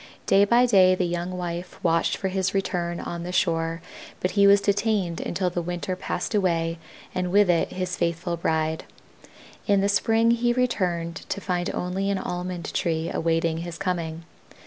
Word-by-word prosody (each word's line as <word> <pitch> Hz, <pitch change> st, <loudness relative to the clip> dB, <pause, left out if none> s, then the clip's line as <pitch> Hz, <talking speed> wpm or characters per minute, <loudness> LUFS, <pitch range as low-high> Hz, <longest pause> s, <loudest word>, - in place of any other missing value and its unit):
Day 200 Hz, +1 st, +5 dB
by 235 Hz, +4 st, +4 dB
day 190 Hz, -6 st, +5 dB
the 185 Hz, -, 0 dB
young 175 Hz, +1 st, -3 dB
wife 175 Hz, 0 st, -5 dB
watched 165 Hz, -1 st, +2 dB
for 190 Hz, -, -2 dB
his 190 Hz, +1 st, -1 dB
return 175 Hz, -3 st, -1 dB
on 170 Hz, 0 st, -5 dB
the 175 Hz, +1 st, -5 dB
shore, 165 Hz, -1 st, 0 dB, 0.4 s
but 185 Hz, -, -1 dB
he 200 Hz, -1 st, +5 dB
was 200 Hz, 0 st, +7 dB
detained 200 Hz, -3 st, 0 dB
until 180 Hz, 0 st, -1 dB
the 175 Hz, -, -2 dB
winter 175 Hz, +2 st, -3 dB
passed 180 Hz, +1 st, -4 dB
away 165 Hz, -4 st, +1 dB, 0.3 s
and 180 Hz, -1 st, -2 dB
with 200 Hz, -1 st, +5 dB
it 170 Hz, -, 0 dB
his 185 Hz, -1 st, -2 dB
faithful 170 Hz, 0 st, -1 dB
bride. 160 Hz, -1 st, -1 dB, 0.8 s
In 200 Hz, -2 st, +4 dB
the 200 Hz, -, +2 dB
spring 225 Hz, +3 st, +3 dB
he 240 Hz, +1 st, +2 dB
returned 180 Hz, -9 st, -1 dB
to -, -, -2 dB
find 180 Hz, -2 st, -2 dB
only 190 Hz, +2 st, -2 dB
an 200 Hz, -, +1 dB
Almond 180 Hz, -1 st, -4 dB
tree 165 Hz, -2 st, -1 dB
awaiting 165 Hz, 0 st, 0 dB
his 170 Hz, -1 st, -6 dB
coming. 165 Hz, -3 st, -3 dB
180 Hz, 170 wpm, -25 LUFS, 170-195 Hz, 0.8 s, was